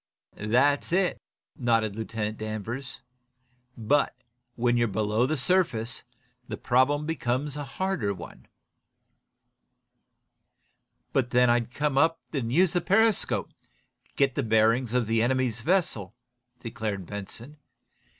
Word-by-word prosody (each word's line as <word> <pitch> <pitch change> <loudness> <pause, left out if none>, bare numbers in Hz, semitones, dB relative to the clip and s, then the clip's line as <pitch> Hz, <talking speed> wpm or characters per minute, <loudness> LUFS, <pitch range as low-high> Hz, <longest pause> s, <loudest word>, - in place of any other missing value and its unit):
"That's 130 +9 +2
it," 185 0 +1 0.3
nodded 115 -4 +1
Lieutenant 110 -1 -4
Danvers. 110 +5 -5 0.8
"But, 130 +6 +1 0.4
when 120 0 +2
you're 120 -1 +2
below 110 +3 +1
the 155 +2 -1
surface, 125 -7 +1 0.5
the - - -5
problem 135 +4 +2
becomes 145 -2 -2
a 145 - -4
harder 140 - -2
one." 100 - -10 2.7
"But 125 -2 +1
then 125 0 +4
I'd 120 -1 +1
come 145 +1 0
up 165 +2 +3
enough 135 -5 -1
to - - -3
use 175 +5 +3
the 175 - +1
periscope, 220 +3 +2
and - - -39
get 135 -2 +2
the 140 - -1
bearings 115 +1 +2
of 125 -2 +2
the 115 +1 +1
enemy's 125 -1 0
vessel," 135 - 0 0.5
declared 110 -5 -4
Benson. 110 - -8
125 Hz, 120 wpm, -27 LUFS, 110-145 Hz, 2.7 s, then